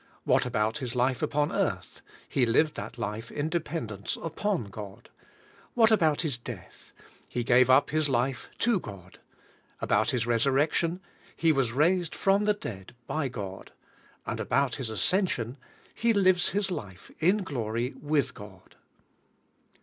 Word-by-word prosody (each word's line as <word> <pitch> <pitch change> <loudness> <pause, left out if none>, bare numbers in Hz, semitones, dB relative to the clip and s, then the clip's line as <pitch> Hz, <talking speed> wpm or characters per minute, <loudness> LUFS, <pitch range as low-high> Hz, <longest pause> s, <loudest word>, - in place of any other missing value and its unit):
What - - +3
about 110 +6 0
His 125 -3 -4
life 125 +1 +1
upon 145 0 +1
earth? - - -2 0.3
He 135 - +1
lived 150 +7 +3
that - - -7
life 110 0 -4
in 150 +2 -2
dependence 145 - -3
iLfon 165 - -2
God, 100 -1 -9 0.8
About 160 -8 +3
His 145 -8 -2
death? - - -10 0.4
He 120 - -2
gave 125 +1 +5
up 130 +2 +5
His 155 -1 +1
life 130 +1 0
to 235 -4 +2
God. 95 - -11 0.6
About 110 +2 +2
His 120 -3 0
resurrection? 140 +8 +1 0.3
He 165 -1 +3
was 135 -5 +1
raised 170 +6 +2
from 200 +1 +2
the 210 0 +3
dead 105 - -8
hy 155 -3 -1
God, 100 -6 -7 0.5
And - - -3
about 140 -2 +1
His 130 -5 -4
as 110 - -4
cension? 155 - +1 0.4
He 230 0 +2
lives 185 -3 +4
His 200 0 -1
life 95 - -7
in 190 +5 +3
glory 120 -5 -2
with 145 -2 +1
God. 95 -2 -13
135 Hz, 145 wpm, -28 LUFS, 115-165 Hz, 0.8 s, gave